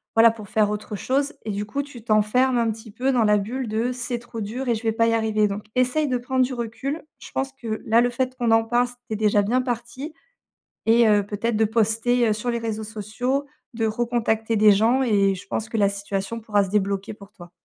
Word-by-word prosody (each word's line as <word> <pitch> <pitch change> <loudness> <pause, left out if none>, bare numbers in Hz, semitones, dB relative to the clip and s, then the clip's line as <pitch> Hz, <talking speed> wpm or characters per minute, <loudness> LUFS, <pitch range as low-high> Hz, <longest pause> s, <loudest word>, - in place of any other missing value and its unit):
voilà, 225 0 +7
pour 215 -3 -11
faire 215 -1 +2
autre 210 0 -5
chose 280 +6 0
et 215 - -2
du 205 +1 -3
coup, 280 +7 -3
tu 255 -5 -12
t'enfermes 235 +4 +2
un 230 -1 +1
petit 220 0 -10
peu 260 +5 0
dans 240 -3 +3
la 210 0 +4
bulle 240 +5 -3
de 225 +3 0
«C'est 245 0 -3
trop 235 -1 -8
dur 240 +6 -4
et - - +4
je 220 - -5
vais 225 - +2
pas 230 +1 +2
y 230 - +2
arriver», 220 -2 +2
donc 205 +1 -5
essaye 255 +4 +2
de 250 - +1
prendre 255 +1 +1
du 260 - -5
recul. 245 +6 -4 0.2
Je - - -12
pense 270 0 -2
que, 230 -5 -5
là, 230 +2 +4
le 245 - +2
fait 255 +1 -2
qu'on 240 -2 0
en 225 0 +4
parle, 240 +2 +2 0.2
c'est 220 - -2
déjà 210 -1 +3
bien 245 +5 +1
parti 250 +5 -5 0.7
et 230 +1 +5
heu, 205 -1 +4
peut-être, 215 +2 -2
de 220 - +3
poster, 225 +2 +2
heu, 215 - +3
sur 230 +3 -2
les 235 - -1
réseaux 220 -1 -3
sociaux, 225 +6 -2 0.3
de 225 -1 0
recontacter 225 0 0
des 210 0 +6
gens 230 +6 +3
et 200 -5 +3
je 185 - -10
pense 220 - -3
que 225 - -3
la 200 -1 +4
situation 200 +2 -4
pourra 210 -2 +1
se - - -6
débloquer 200 0 -1
pour 200 -1 -15
toi. 175 -1 -13
225 Hz, 240 wpm, -23 LUFS, 210-245 Hz, 0.7 s, voilà